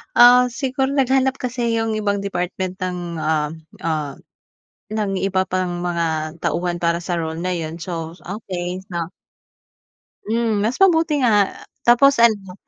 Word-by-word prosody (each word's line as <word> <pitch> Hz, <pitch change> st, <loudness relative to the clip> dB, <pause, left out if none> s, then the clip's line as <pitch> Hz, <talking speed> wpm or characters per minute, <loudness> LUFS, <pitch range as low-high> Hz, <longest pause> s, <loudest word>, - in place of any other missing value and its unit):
Ah, 245 Hz, +1 st, +7 dB
siguro 265 Hz, +2 st, -1 dB
naghanap 265 Hz, -1 st, +2 dB
kasi 245 Hz, -2 st, -1 dB
'yung 225 Hz, -1 st, 0 dB
ibang 205 Hz, -1 st, 0 dB
department 185 Hz, -1 st, -3 dB
ng, 180 Hz, -1 st, -2 dB, 0.2 s
ah 155 Hz, -1 st, 0 dB, 0.3 s
ah 155 Hz, -3 st, -2 dB, 0.8 s
ng 210 Hz, -3 st, -1 dB
iba 190 Hz, -1 st, 0 dB
pang 180 Hz, -1 st, -2 dB
mga 165 Hz, -2 st, -1 dB
tauhan 175 Hz, 0 st, -1 dB
para 170 Hz, 0 st, +2 dB
sa 175 Hz, 0 st, -3 dB
role 160 Hz, -1 st, -3 dB
na 180 Hz, +1 st, -1 dB
'yun 165 Hz, 0 st, -5 dB
so 165 Hz, -1 st, -5 dB, 0.2 s
okey, 185 Hz, -2 st, -5 dB
so 170 Hz, -2 st, -2 dB, 1.2 s
Hmm, 225 Hz, -2 st, +1 dB
mas 225 Hz, +4 st, 0 dB
mabuti 325 Hz, -5 st, +4 dB
nga, 205 Hz, -4 st, +4 dB, 0.3 s
tapos 245 Hz, +2 st, +5 dB
ano 205 Hz, -5 st, +3 dB
195 Hz, 135 wpm, -21 LUFS, 175-235 Hz, 1.2 s, Ah